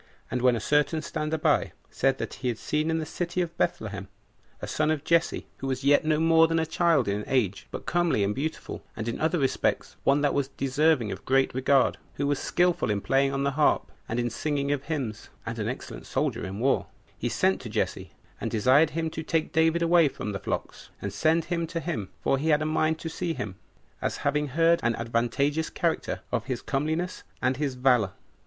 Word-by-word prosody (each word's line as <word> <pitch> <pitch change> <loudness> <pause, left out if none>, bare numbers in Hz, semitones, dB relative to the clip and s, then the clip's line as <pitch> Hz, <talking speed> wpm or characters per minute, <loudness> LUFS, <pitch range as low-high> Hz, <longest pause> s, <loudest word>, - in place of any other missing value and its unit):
And 125 - -1
when 125 -1 +4
a - - -1
certain 150 +6 +1
stander 155 +1 -2
by - - +2 0.2
said - - +1
that - - -4
he 130 - -1
had 120 -3 -1
seen 155 +5 -1
in 160 - +1
the 160 - -2
city 175 +3 -3
of 170 -1 -2
Bethlehem 100 - -2 0.5
a - - -5
son 155 0 0
of 155 -3 0
Jesse, 170 0 +1
who 135 - -5
was 130 0 -2
yet 145 +1 +5
no 155 -1 +2
more 165 0 +5
than 165 0 0
a 160 - +2
child 165 -3 +2
in 100 +1 -1
age, 110 -8 0
but - - -7
comely 175 -11 +2
and 100 +1 +1
beautiful, 155 +7 -4
and 110 - -4
in 115 - -3
other 160 +3 +2
respects 135 -4 0
one 140 +1 +3
that 145 -1 +2
was 140 -1 +1
deserving 135 -3 +1
of - - -6
great 135 0 +2
regard, 130 +1 +3 0.2
who 140 - -1
was 145 -1 +1
skillful 175 -8 +1
in 105 -1 +1
playing 135 +5 +2
on 135 0 -1
the 140 - +1
harp, 150 +2 +2 0.2
and 115 - -1
in 120 0 -1
singing 140 +2 -1
of 145 -1 -1
hymns, 130 -10 -4 0.2
[and - - -4
an - - -1
excellent - - -7
soldier - - -1
in 95 +1 -6
war,] 135 +5 +1 0.3
he - - -2
sent - - +1
to - - -7
Jesse, - - -2 0.3
and - - -1
desired 130 +8 +4
him 160 -1 -1
to 160 - -4
take 160 0 -1
David 160 +1 +3
away 170 -1 +5
from 105 -6 -4
the 100 - -4
flocks, 100 - -5
and 100 -1 -5
send 160 +9 +2
him 170 -2 -1
to 165 +1 -3
him, 155 - -3
for 135 - +1
he 160 +3 0
had 150 0 +4
a - - -2
mind 155 0 +1
to - - -4
see 165 0 -3
him, 105 -3 -4 0.5
as - - -1
having 150 +1 +1
heard 165 +4 +3
an 115 0 +1
advantageous 120 +7 0
character - - -1
of 115 - -1
his 130 -2 -3
comeliness 160 +6 -1 0.2
and 130 0 +1
his 140 -3 -1
valor. 125 -6 +3
145 Hz, 215 wpm, -27 LUFS, 125-160 Hz, 0.5 s, yet